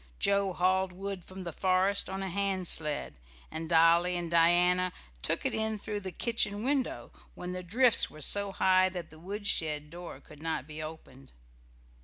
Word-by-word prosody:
Joe 200 Hz, -1 st, +1 dB
hauled 185 Hz, +1 st, +1 dB
wood 195 Hz, 0 st, -6 dB
from 185 Hz, +1 st, -9 dB
the 170 Hz, -2 st, -6 dB
forest 190 Hz, +3 st, +1 dB
on 190 Hz, 0 st, -4 dB
a -, -, -3 dB
hand 190 Hz, -1 st, -1 dB
sled, 150 Hz, -, -1 dB, 0.3 s
and 160 Hz, 0 st, -6 dB
Dolly 170 Hz, +2 st, +4 dB
and 170 Hz, -1 st, -5 dB
Diana 175 Hz, +2 st, +4 dB, 0.3 s
took -, -, 0 dB
it -, -, 0 dB
in 220 Hz, 0 st, -1 dB
through 210 Hz, 0 st, -4 dB
the 190 Hz, -2 st, -6 dB
kitchen 210 Hz, +1 st, -1 dB
window 270 Hz, 0 st, -1 dB, 0.2 s
when 180 Hz, -, -6 dB
the 180 Hz, 0 st, -4 dB
drifts 230 Hz, +6 st, +5 dB
were 155 Hz, -, -13 dB
so 200 Hz, +6 st, +3 dB
high 185 Hz, 0 st, +3 dB
that 175 Hz, -4 st, -7 dB
the 160 Hz, -, -14 dB
woodshed 160 Hz, -6 st, -2 dB
door 175 Hz, 0 st, -9 dB
could 150 Hz, -1 st, -16 dB
not 160 Hz, -5 st, -3 dB
be 155 Hz, +1 st, -8 dB
opened. 135 Hz, -4 st, -10 dB
180 Hz, 175 wpm, -30 LUFS, 165-200 Hz, 0.3 s, drifts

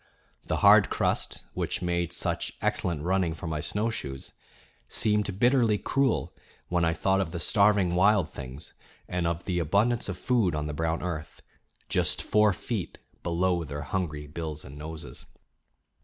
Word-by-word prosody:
The -, -, -1 dB
hard -, -, +8 dB
crust, -, -, -1 dB
which -, -, -2 dB
made 85 Hz, -1 st, 0 dB
such 90 Hz, -, -2 dB
excellent 85 Hz, -4 st, 0 dB
running 90 Hz, -2 st, +1 dB
for 85 Hz, -, -8 dB
my 80 Hz, -2 st, -2 dB
snowshoes, 100 Hz, -10 st, -3 dB, 0.5 s
seemed 105 Hz, -3 st, +1 dB
bitterly 120 Hz, -3 st, +4 dB
cruel 135 Hz, +3 st, 0 dB, 0.3 s
when 85 Hz, -1 st, +1 dB
I 80 Hz, -, +3 dB
thought 95 Hz, +3 st, +2 dB
of 85 Hz, -4 st, -3 dB
the 85 Hz, -, -4 dB
starving 100 Hz, -1 st, +3 dB
wild 95 Hz, -1 st, +4 dB
things 70 Hz, +2 st, -9 dB, 0.3 s
and 90 Hz, -1 st, -1 dB
of 85 Hz, +1 st, -2 dB
the 90 Hz, -2 st, 0 dB
abundance 100 Hz, +8 st, +1 dB
of 90 Hz, -, -4 dB
food 110 Hz, -8 st, +1 dB
on 75 Hz, 0 st, -2 dB
the 75 Hz, -, -3 dB
brown 80 Hz, +2 st, -1 dB
earth, 80 Hz, -4 st, -5 dB, 0.4 s
just -, -, 0 dB
four 105 Hz, -1 st, +4 dB
feet 100 Hz, +1 st, -4 dB, 0.2 s
below 85 Hz, 0 st, +1 dB
their 75 Hz, -1 st, -5 dB
hungry 75 Hz, -3 st, -3 dB
bills 75 Hz, 0 st, -6 dB
and 70 Hz, -, -10 dB
noses. 80 Hz, +2 st, -8 dB
90 Hz, 155 wpm, -28 LUFS, 80-100 Hz, 0.5 s, hard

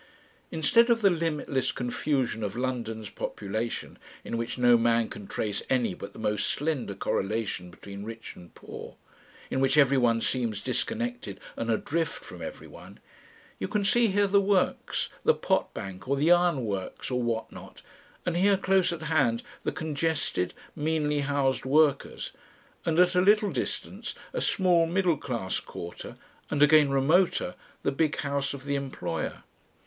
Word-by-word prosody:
Instead 230 Hz, +9 st, +4 dB
of 230 Hz, -2 st, +3 dB
the 200 Hz, -, +6 dB
limitless 155 Hz, -5 st, 0 dB
confusion 125 Hz, -1 st, -1 dB
of 105 Hz, 0 st, -3 dB
London's 115 Hz, -4 st, -3 dB
population, 110 Hz, +3 st, -4 dB, 0.2 s
in -, -, -4 dB
which 115 Hz, +1 st, -3 dB
no 120 Hz, -1 st, +6 dB
man 115 Hz, -1 st, +3 dB
can 100 Hz, -, -9 dB
trace 105 Hz, -2 st, -2 dB
any 125 Hz, -7 st, +2 dB
but 100 Hz, -, -8 dB
the -, -, -15 dB
most 105 Hz, -1 st, 0 dB
slender 145 Hz, -9 st, -1 dB
correlation 100 Hz, -2 st, -2 dB
between 100 Hz, +3 st, -9 dB
rich 115 Hz, +1 st, -8 dB
and 90 Hz, -1 st, -15 dB
poor, -, -, -9 dB, 0.6 s
in -, -, 0 dB
which 135 Hz, +2 st, +3 dB
everyone 130 Hz, -5 st, +4 dB
seems 115 Hz, -3 st, -1 dB
disconnected 240 Hz, -, -3 dB, 0.2 s
and 115 Hz, -, -3 dB
adrift 165 Hz, +9 st, -1 dB
from -, -, -10 dB
everyone, -, -, -9 dB, 0.6 s
you -, -, -2 dB
can 210 Hz, -2 st, 0 dB
see 235 Hz, +3 st, +4 dB
here 205 Hz, 0 st, +3 dB
the 200 Hz, 0 st, +4 dB
works, 195 Hz, -1 st, +1 dB
the -, -, +5 dB
potbank 95 Hz, +2 st, -2 dB
or 140 Hz, -, +2 dB
the 150 Hz, +5 st, +3 dB
ironworks 130 Hz, -, +1 dB
or 125 Hz, 0 st, +1 dB
what 115 Hz, -1 st, -2 dB
not, -, -, -12 dB, 0.4 s
and 175 Hz, -, 0 dB
here 195 Hz, +2 st, +4 dB
close 190 Hz, -1 st, +2 dB
at 165 Hz, -2 st, -5 dB
hand 135 Hz, -8 st, +2 dB, 0.2 s
the -, -, 0 dB
congested, 155 Hz, -, -1 dB, 0.2 s
meanly 150 Hz, -1 st, 0 dB
housed 140 Hz, -2 st, +1 dB
workers, 145 Hz, +1 st, +2 dB, 0.6 s
and 165 Hz, +1 st, +2 dB
at 180 Hz, 0 st, +5 dB
a 180 Hz, -, +4 dB
little 210 Hz, +2 st, +4 dB
distance -, -, -4 dB, 0.2 s
a -, -, -1 dB
small 175 Hz, -3 st, +3 dB
middle 180 Hz, -1 st, +2 dB
class 115 Hz, -9 st, -2 dB
quarter, 85 Hz, 0 st, -8 dB, 0.3 s
and 145 Hz, 0 st, +3 dB
again 150 Hz, -1 st, +6 dB
remoter, 160 Hz, +7 st, +2 dB, 0.3 s
the -, -, +2 dB
big 150 Hz, +2 st, +1 dB
house 140 Hz, -1 st, -1 dB
of 135 Hz, 0 st, -11 dB
the 140 Hz, -, -1 dB
employer. 130 Hz, -, -3 dB
140 Hz, 155 wpm, -28 LUFS, 115-170 Hz, 0.6 s, the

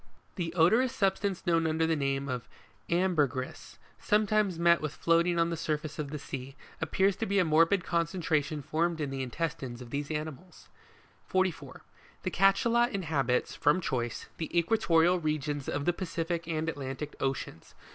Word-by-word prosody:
The 170 Hz, -4 st, -2 dB
odorous 225 Hz, +10 st, +4 dB
substance 195 Hz, -3 st, 0 dB
known 165 Hz, -2 st, +2 dB
under 160 Hz, +1 st, +1 dB
the 160 Hz, 0 st, +2 dB
name 135 Hz, -1 st, -1 dB
of 125 Hz, -3 st, -4 dB, 0.4 s
Jlmberyris, 155 Hz, -8 st, 0 dB, 0.2 s
sometimes 210 Hz, -3 st, +2 dB
met 170 Hz, 0 st, +4 dB
with 155 Hz, -1 st, -4 dB
floating 170 Hz, +1 st, +2 dB
on 170 Hz, 0 st, +2 dB
the -, -, -1 dB
surface 155 Hz, -1 st, -3 dB
of 145 Hz, -2 st, -3 dB
the 150 Hz, -, -4 dB
sea, 135 Hz, -1 st, -7 dB, 0.3 s
appears 190 Hz, +5 st, +2 dB
to 225 Hz, -, -2 dB
be 200 Hz, -, +1 dB
a 185 Hz, -, +4 dB
morbid 165 Hz, +4 st, +4 dB
concretion 165 Hz, -4 st, -1 dB
formed 165 Hz, +3 st, 0 dB
in 145 Hz, -3 st, -2 dB
the 135 Hz, -1 st, -3 dB
intestines 130 Hz, -2 st, -4 dB
of 125 Hz, -2 st, -10 dB
these 145 Hz, 0 st, -3 dB
animals. 155 Hz, +3 st, -6 dB, 0.6 s
44. 185 Hz, -3 st, -1 dB, 0.4 s
The -, -, -2 dB
Cachalot 230 Hz, +5 st, +3 dB
inhabits, 145 Hz, -10 st, 0 dB
from 150 Hz, +5 st, +2 dB
choice, 120 Hz, -9 st, -2 dB
the 160 Hz, -, -4 dB
equatorial 170 Hz, -2 st, +3 dB
regions 150 Hz, -3 st, -2 dB
of 145 Hz, 0 st, -2 dB
the 175 Hz, -, +3 dB
Pacific 170 Hz, -2 st, -3 dB
and 160 Hz, -1 st, -2 dB
Atlantic 145 Hz, -1 st, -4 dB
oceans. 135 Hz, -, -4 dB
165 Hz, 155 wpm, -30 LUFS, 145-180 Hz, 0.6 s, odorous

